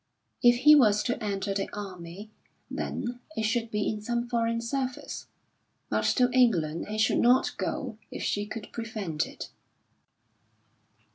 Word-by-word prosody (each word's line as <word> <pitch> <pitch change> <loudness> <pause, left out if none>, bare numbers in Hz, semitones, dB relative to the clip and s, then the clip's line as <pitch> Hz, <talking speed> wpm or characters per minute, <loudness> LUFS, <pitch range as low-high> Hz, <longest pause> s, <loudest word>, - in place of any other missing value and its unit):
If 240 0 +5
he 300 +3 +9
was 215 -8 +5
to 245 -2 -2
enter 200 -1 -1
the 195 0 -2
army, 195 0 -8 0.4
then 245 0 -3 0.2
it 220 - 0
should 225 +1 0
be 210 -1 -1
in 215 -1 -2
some 235 +2 -1
foreign 230 -1 0
service. 255 +2 -4 0.6
But - - +1
to 250 -1 +4
England 180 -11 +2
he 215 +1 -4
should 215 - +3
not 250 +2 +4
go - - -3
if - - -6
she 205 0 -1
could 220 -1 -7
prevent 215 -9 -3
it. - - -9
225 Hz, 145 wpm, -28 LUFS, 205-240 Hz, 0.6 s, he